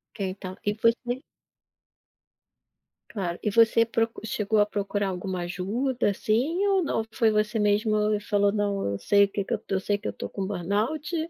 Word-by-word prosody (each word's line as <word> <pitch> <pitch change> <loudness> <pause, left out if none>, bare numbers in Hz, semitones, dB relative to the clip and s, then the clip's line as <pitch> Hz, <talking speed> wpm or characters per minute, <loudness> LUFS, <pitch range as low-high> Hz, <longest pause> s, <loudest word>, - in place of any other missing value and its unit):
Ok - - -16
então, 185 0 -7
e 205 - +1
você 240 +3 0 1.9
Claro, 180 -5 -3
e 210 - +1
você 230 +1 +5
proc 225 0 0
chegou 215 0 0
a 205 - +5
procurar 205 -1 -2
alguma 185 0 -4
ajuda, 210 +9 -1
assim, 255 - 0
ou 390 -2 +3
não, 225 -7 -1
foi 230 -3 +3
você 215 +1 +1
mesmo 210 +1 +2 0.2
e 210 - +1
falou: 205 -1 +2
"Não, 205 -1 -1
eu - - -2
sei 200 - +4
o - - -5
que 200 - -1
que 215 - -3
eu 220 - -2
eu 190 - +1
sei 205 +1 0
que 205 - -6
eu - - -1
estou - - -7
com 195 -1 -4
burnout, 210 - -2
210 Hz, 185 wpm, -26 LUFS, 200-230 Hz, 1.9 s, você